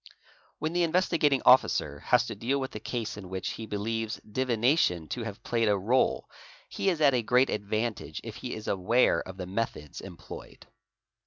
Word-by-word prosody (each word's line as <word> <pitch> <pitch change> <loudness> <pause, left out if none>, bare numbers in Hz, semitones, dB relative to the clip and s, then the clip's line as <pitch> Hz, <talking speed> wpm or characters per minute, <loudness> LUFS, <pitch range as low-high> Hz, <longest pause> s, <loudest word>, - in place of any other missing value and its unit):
When 155 +2 -2
the 175 - +1
Investigating 165 -5 +2
Officer 130 +1 +4
has - - +3
to - - -5
deal 135 +4 -1
with 130 -1 -4
a 105 - -5
case 115 -1 -4
in 95 -3 -9
which 95 +2 -3
he 115 -1 -6
believes 110 +2 -3
divination 120 - +1
to 125 - -3
have 115 -1 -7
played 115 -1 +1
a 105 - +4
réle 110 +7 +2 0.4
he 195 - -1
is 170 -4 -1
at 140 -3 +6
a 125 - +2
great 125 +3 +3
advantage 105 -5 -2
if 115 -2 -7
he 125 - -5
is 110 0 -8
aware 100 0 +3
of 95 0 -9
the 90 - -5
methods 95 -6 -4
employed. - - -11
115 Hz, 180 wpm, -28 LUFS, 105-130 Hz, 0.4 s, at